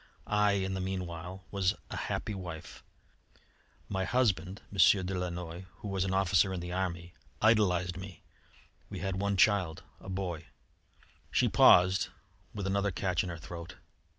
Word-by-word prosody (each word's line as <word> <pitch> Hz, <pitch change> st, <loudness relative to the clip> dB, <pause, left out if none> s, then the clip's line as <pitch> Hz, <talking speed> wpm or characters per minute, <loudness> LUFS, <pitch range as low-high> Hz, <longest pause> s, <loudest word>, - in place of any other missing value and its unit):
I, 105 Hz, -1 st, +3 dB
in 95 Hz, -1 st, -1 dB
the 95 Hz, -, -2 dB
meanwhile, 90 Hz, -1 st, -5 dB
was 95 Hz, -2 st, +1 dB, 0.2 s
a -, -, -3 dB
happy 105 Hz, -, -3 dB
wife. 90 Hz, -5 st, -8 dB, 1.0 s
My 95 Hz, -1 st, -1 dB
husband, 100 Hz, -4 st, 0 dB
M. 100 Hz, -, -8 dB, 0.3 s
de 95 Hz, -, -3 dB
Lannoy, 90 Hz, 0 st, -4 dB
who 105 Hz, -, -7 dB
was 95 Hz, -1 st, 0 dB
an 95 Hz, -, -1 dB
officer 95 Hz, 0 st, +3 dB
in 95 Hz, -, -3 dB
the 90 Hz, 0 st, -6 dB
army, 90 Hz, -2 st, -3 dB, 0.3 s
idolised 90 Hz, -5 st, +3 dB
me. 95 Hz, -3 st, -9 dB, 0.7 s
We 100 Hz, -, -6 dB
had 95 Hz, +1 st, -2 dB
one 100 Hz, -1 st, 0 dB
child, 95 Hz, -4 st, +3 dB, 0.2 s
a -, -, -10 dB
boy 90 Hz, -4 st, -4 dB, 0.4 s
" -, -, -31 dB
She -, -, +3 dB
paused, 90 Hz, +1 st, +6 dB, 0.4 s
with 100 Hz, -2 st, -5 dB
another 100 Hz, +1 st, +1 dB
catch 90 Hz, -1 st, 0 dB
in 90 Hz, -, -4 dB
her 85 Hz, -, -5 dB
throat. 85 Hz, +1 st, -8 dB
95 Hz, 155 wpm, -31 LUFS, 90-100 Hz, 1.0 s, paused